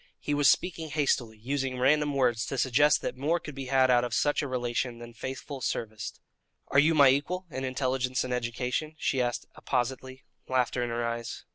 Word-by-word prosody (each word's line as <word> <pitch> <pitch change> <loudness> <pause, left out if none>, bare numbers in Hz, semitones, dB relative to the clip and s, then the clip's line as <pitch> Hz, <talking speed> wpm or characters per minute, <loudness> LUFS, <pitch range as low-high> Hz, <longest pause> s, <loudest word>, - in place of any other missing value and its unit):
He 145 - -2
was 145 -2 +5
speaking 165 0 0
hastily, 135 -7 0
using 130 +3 -2
random 145 +3 +2
words 120 -5 +1
to 135 - -3
suggest 135 +4 +3
that - - -3
more 150 +6 0
could 150 -3 -8
be 135 -1 -6
had 130 0 +4
out 120 -1 +4
of 120 -1 -2
such 145 0 +2
a 145 - -3
relation 120 -1 -2
than 120 0 -10
faithful 130 +3 -6
service. 110 -2 -3 0.6
"Are 135 - +4
you 160 +3 +4
my 140 -3 +7
equal 175 +8 0
in 130 - -4
intelligence 130 -1 -1
and 125 - -3
education?" 125 +5 -2
she 135 -3 0
asked 120 -1 -2
appositely, 130 +1 -3 0.2
laughter 125 -1 +1
in 120 - -2
her 120 0 -1
eyes. 115 0 -4
130 Hz, 190 wpm, -28 LUFS, 120-145 Hz, 0.6 s, my